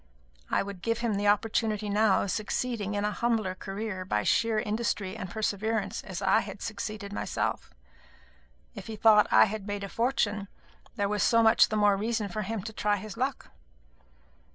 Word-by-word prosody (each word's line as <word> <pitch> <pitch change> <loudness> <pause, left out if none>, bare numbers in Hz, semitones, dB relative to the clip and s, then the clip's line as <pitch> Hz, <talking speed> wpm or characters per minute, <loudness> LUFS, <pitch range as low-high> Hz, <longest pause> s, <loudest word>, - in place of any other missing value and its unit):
I - - +1
would 200 -2 -8
give 230 +2 0
him 235 -3 0
the 205 +1 0
opportunity 215 0 +1
now 205 0 +3
of 200 - -2
succeeding 215 -1 -2
in 205 0 0
a 210 - 0
humbler 220 -4 0
career 195 0 -5
by 105 - -1
sheer 225 - +2
industry 210 -2 -1
and 190 -4 -6
perseverance 215 +1 -2
as 190 +1 -6
I 190 - +4
had 200 0 -6
succeeded 210 -1 -5
myself. - - -2 1.0
If - - -9
he 220 - -5
thought 210 -1 +5
that - - +4
I - - +9
had 215 -1 -5
made 205 0 -3
a 200 - -5
fortune, 210 -4 0 0.5
there 200 - 0
was 210 0 -1
so 230 -1 +4
much 220 +1 +6
the 215 - -1
more 205 -1 +4
reason 220 0 -1
for 215 +4 -3
him 210 0 -4
to 220 +1 -7
try 210 -1 +1
his 215 +1 -8
luck. 260 +3 -3
210 Hz, 185 wpm, -28 LUFS, 200-225 Hz, 1.0 s, I